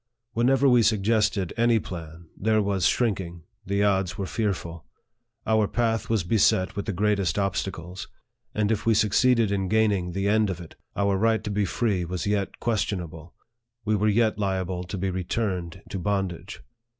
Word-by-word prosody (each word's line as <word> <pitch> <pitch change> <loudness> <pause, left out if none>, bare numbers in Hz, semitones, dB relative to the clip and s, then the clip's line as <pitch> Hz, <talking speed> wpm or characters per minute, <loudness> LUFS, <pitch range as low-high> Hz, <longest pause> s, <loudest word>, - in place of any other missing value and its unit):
Whenever 135 +4 +3
we 125 -2 +5
suggested 105 -3 +1
any 120 0 +4
plan, 85 -4 -7
there 110 +1 +1
was 100 -4 +1
shrink 115 -6 +1
ing 85 -2 -9 0.2
the 100 +1 +1
odds 95 -2 +1
were 100 - -2
fearful. 90 -6 -3 0.6
Our 110 -2 +2
path 115 -1 -1
was 110 -5 +1
beset 95 -1 +2
with 100 - -3
the - - 0
greatest 100 0 0
obstacles; 95 -2 -3 0.5
and 105 0 +1
if 110 - 0
we 115 - +4
succeeded 110 +1 +3
in 95 -1 0
gaining 100 -4 +1
the 95 +2 -1
end 105 0 +3
of 90 -2 -3
it, 85 -2 -10 0.2
our 100 -1 +1
right 110 +1 +2
to 105 - -3
be 100 0 +1
free 95 0 0
was 90 0 -4
yet 100 -1 -1
questionable 90 -7 -3 0.5
we 110 0 +2
were 105 +1 +2
yet 110 0 +2
liable 95 -2 -1
to 95 +3 -5
be 95 +1 -1
returned 90 -2 -3
to 95 - -4
bondage. 95 -2 -3
100 Hz, 170 wpm, -25 LUFS, 90-110 Hz, 0.6 s, we